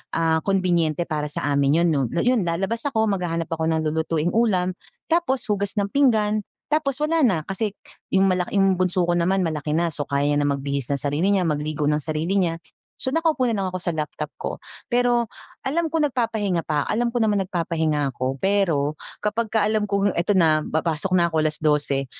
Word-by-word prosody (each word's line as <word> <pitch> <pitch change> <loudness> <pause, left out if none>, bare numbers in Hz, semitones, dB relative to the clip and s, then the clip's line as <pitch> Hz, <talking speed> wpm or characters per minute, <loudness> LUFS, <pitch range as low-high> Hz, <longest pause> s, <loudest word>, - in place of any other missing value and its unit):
ah 160 -1 +2
konbinyente 175 -4 +1
para 155 -3 -3
sa 150 - -3
amin 140 +4 +3
yun 175 - +3
‘no. 145 -3 +1 0.2
Yun 245 -7 +2
lalabas 195 - -1
ako, 220 -5 +1
maghahanap 175 -5 -2
ako 160 0 -1
ng 160 -1 +1
lulutuing 160 +1 0
ulam, 190 -5 +2 0.4
tapos 330 -7 +1
hugas 205 -1 -2
ng 200 0 0
pinggan, 215 -6 +3 0.3
tapos 275 -4 +1
wala 325 0 +1
na. 210 - +4
Kasi 210 +3 -2 0.4
yung 190 0 +3
malaki 185 +1 0
yung 190 -2 +3
bunso 180 -1 +1
ko 175 - +1
naman 180 +2 +1
malaki 155 -1 -2
na, 170 -1 0
so 145 - -4
kaya 140 0 +1
niya 145 - +2
na 145 - +1
magbihis 140 -2 -3
nang 140 - +1
sarili 145 +8 0
niya, 195 -3 +2
mag-ligo 150 -1 -1
nang 150 +1 +1
sarili 160 +4 -2
niya. 165 -2 0 0.4
So - - +1
naka-upo 310 -4 +1
na 225 - 0
lang 195 - -1
ako 185 - -4
sa 175 - -2
laptop 150 -1 -4
ko. - - -3 0.3
Pero 245 -1 +2 0.4
alam 325 +4 0
ko 325 - -1
nagpapahinga 230 - 0
pa, 150 -3 -1
alam 240 +2 0
ko 240 - -3
naman 210 -4 +2
nagpapahinga 160 -6 -1
ako, 130 +2 -2
pero 170 -5 +1 0.2
kapagka 220 0 0
alam 215 -1 0
kong 200 0 +1
eto 190 +4 +1
na 155 -3 +4
papasok 160 +3 -1
na 170 - +4
ko, 160 - +2
12:00. 150 -3 +1
180 Hz, 190 wpm, -23 LUFS, 155-215 Hz, 0.4 s, na